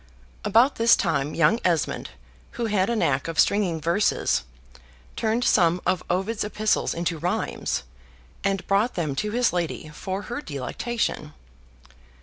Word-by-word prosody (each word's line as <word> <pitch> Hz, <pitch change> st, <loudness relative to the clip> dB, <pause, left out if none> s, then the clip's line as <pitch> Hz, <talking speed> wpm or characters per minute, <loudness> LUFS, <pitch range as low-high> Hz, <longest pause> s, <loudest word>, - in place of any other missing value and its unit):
About 235 Hz, +7 st, +4 dB
this 230 Hz, +1 st, +6 dB
time 140 Hz, 0 st, -1 dB
young 170 Hz, +8 st, +3 dB
Esmond, 170 Hz, -4 st, 0 dB, 0.4 s
who 235 Hz, -, -2 dB
had 205 Hz, -2 st, +1 dB
a 235 Hz, -, +1 dB
knack 140 Hz, -10 st, +1 dB
of 165 Hz, -1 st, -3 dB
stringing 190 Hz, -6 st, +3 dB
verses, 170 Hz, -, +1 dB, 0.7 s
turned 225 Hz, +2 st, 0 dB
some 175 Hz, -6 st, +3 dB
of 185 Hz, -2 st, +1 dB
Ovid's 195 Hz, +5 st, 0 dB
Epistles 215 Hz, +1 st, 0 dB
into 170 Hz, -1 st, -2 dB
rhymes, 180 Hz, -, -2 dB, 0.6 s
and 195 Hz, -1 st, 0 dB
brought 205 Hz, +5 st, +1 dB
them 155 Hz, -5 st, -1 dB
to 210 Hz, -, -1 dB
his 240 Hz, 0 st, +1 dB
lady 170 Hz, -3 st, -3 dB
for 190 Hz, +6 st, -5 dB
her 240 Hz, +6 st, -5 dB
delectation. 150 Hz, -, -3 dB
190 Hz, 135 wpm, -25 LUFS, 165-220 Hz, 0.7 s, this